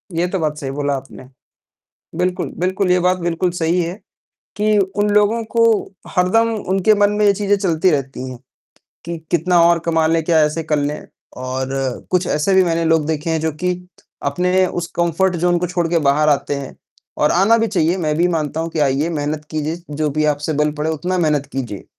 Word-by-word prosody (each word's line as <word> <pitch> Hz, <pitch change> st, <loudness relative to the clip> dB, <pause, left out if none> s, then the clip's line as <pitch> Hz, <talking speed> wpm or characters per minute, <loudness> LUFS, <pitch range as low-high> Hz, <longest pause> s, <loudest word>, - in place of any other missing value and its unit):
ये 175 Hz, +2 st, +1 dB
तो 190 Hz, 0 st, -2 dB
बात 150 Hz, -1 st, -1 dB
सही 135 Hz, -2 st, -4 dB
बोला 145 Hz, 0 st, -1 dB
आपने। 135 Hz, 0 st, -11 dB, 0.9 s
बिल्कुल, 180 Hz, 0 st, -1 dB
बिल्कुल। 185 Hz, +1 st, 0 dB
ये 180 Hz, -, +4 dB
बात 180 Hz, +1 st, +2 dB
बिल्कुल 175 Hz, +1 st, -1 dB
सही 170 Hz, +2 st, +1 dB
है 170 Hz, +1 st, -3 dB, 0.6 s
कि 215 Hz, +1 st, +2 dB
उन 200 Hz, +2 st, 0 dB
लोगों 210 Hz, +3 st, +3 dB
को 230 Hz, 0 st, +4 dB, 0.5 s
हरदम 190 Hz, +6 st, +3 dB, 0.2 s
उनके 195 Hz, +3 st, +4 dB
मन 205 Hz, 0 st, +5 dB
में 210 Hz, -, +3 dB
ये 200 Hz, -, +6 dB
चीजें 205 Hz, 0 st, +1 dB
चलती 185 Hz, -2 st, +1 dB
रहती 135 Hz, -3 st, -2 dB
हैं 125 Hz, -, -9 dB, 0.7 s
कि 170 Hz, 0 st, -4 dB
कितना 175 Hz, +1 st, +3 dB
और 170 Hz, 0 st, +4 dB
कमा 160 Hz, -1 st, +2 dB
लें, 165 Hz, 0 st, +2 dB
क्या 165 Hz, -2 st, +3 dB
ऐसे 150 Hz, +2 st, -1 dB
कर 150 Hz, -1 st, 0 dB
लें 145 Hz, +1 st, -3 dB, 0.4 s
और 130 Hz, +1 st, -3 dB, 0.4 s
कुछ 180 Hz, -1 st, +1 dB
ऐसे 155 Hz, +6 st, +1 dB
भी 190 Hz, 0 st, +5 dB
मैंने 165 Hz, -1 st, 0 dB
लोग 160 Hz, -2 st, +2 dB
देखे 160 Hz, +1 st, -2 dB
हैं 160 Hz, -1 st, 0 dB
जो 160 Hz, 0 st, -1 dB
कि 180 Hz, 0 st, +2 dB, 0.6 s
अपने 180 Hz, +4 st, +2 dB
उस 175 Hz, -1 st, -3 dB
कम्फ़र्ट 175 Hz, +2 st, +1 dB
ज़ोन 175 Hz, +1 st, +2 dB
को 180 Hz, -, -1 dB
छोड़ 175 Hz, -1 st, -1 dB
के 170 Hz, -, +2 dB
बाहर 150 Hz, +2 st, +3 dB
आते 145 Hz, 0 st, +1 dB
हैं, 140 Hz, -1 st, -7 dB, 0.4 s
और 150 Hz, -, +3 dB
आना 195 Hz, +6 st, +4 dB
भी 225 Hz, -, +1 dB
चाहिए। 175 Hz, -4 st, +1 dB
मैं 155 Hz, -4 st, 0 dB
भी 170 Hz, +2 st, +3 dB
मानता 160 Hz, -2 st, -2 dB
हूँ 165 Hz, -, -2 dB
कि 160 Hz, -, -5 dB
आइए 140 Hz, +2 st, +1 dB
मेहनत 150 Hz, -1 st, -3 dB
कीजिए, 155 Hz, +2 st, -3 dB
जो 150 Hz, +1 st, -1 dB
भी 155 Hz, +2 st, 0 dB
आपसे 150 Hz, +2 st, -4 dB
बल 150 Hz, 0 st, +2 dB
पड़े 155 Hz, +2 st, 0 dB
उतना 175 Hz, +4 st, -2 dB
मेहनत 150 Hz, -4 st, +1 dB
कीजिए। 120 Hz, -7 st, -5 dB
165 Hz, 205 wpm, -19 LUFS, 150-180 Hz, 0.9 s, ये